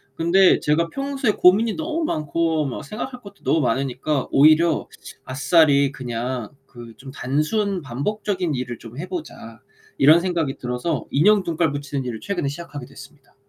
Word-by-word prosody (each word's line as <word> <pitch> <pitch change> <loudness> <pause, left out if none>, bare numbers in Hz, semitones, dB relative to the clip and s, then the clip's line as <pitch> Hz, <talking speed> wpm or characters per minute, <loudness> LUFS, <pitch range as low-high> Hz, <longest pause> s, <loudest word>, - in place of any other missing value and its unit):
근데 180 +3 +4
제가 165 +3 +1
평소에 275 -3 -1
고민이 210 +5 +4
너무 320 +1 -2
많고 160 - 0
막 135 +3 -5
생각할 245 - -7
것도 200 -1 -14
너무 160 - +2
많으니까 135 +2 -1
오히려 155 +3 +4 0.4
아싸리 140 +1 +3
그냥 125 -2 -4 0.2
그 120 -3 -12
'좀 135 - -11
단순 155 - -1
반복적인 180 - -2
일을 125 -2 -5
좀 115 +2 -12
해보자.' 155 -9 -7 0.4
이런 155 +5 +6
생각이 170 -6 -2
들어서 125 +5 -3
인형 200 +8 +4
눈깔 165 -2 0
붙이는 145 -1 -4
일을 115 -3 -5
최근에 175 -7 -2
시작하게 145 -3 -8
됐습니다. 135 +1 -16
150 Hz, 340 characters per minute, -22 LUFS, 135-180 Hz, 0.4 s, 이런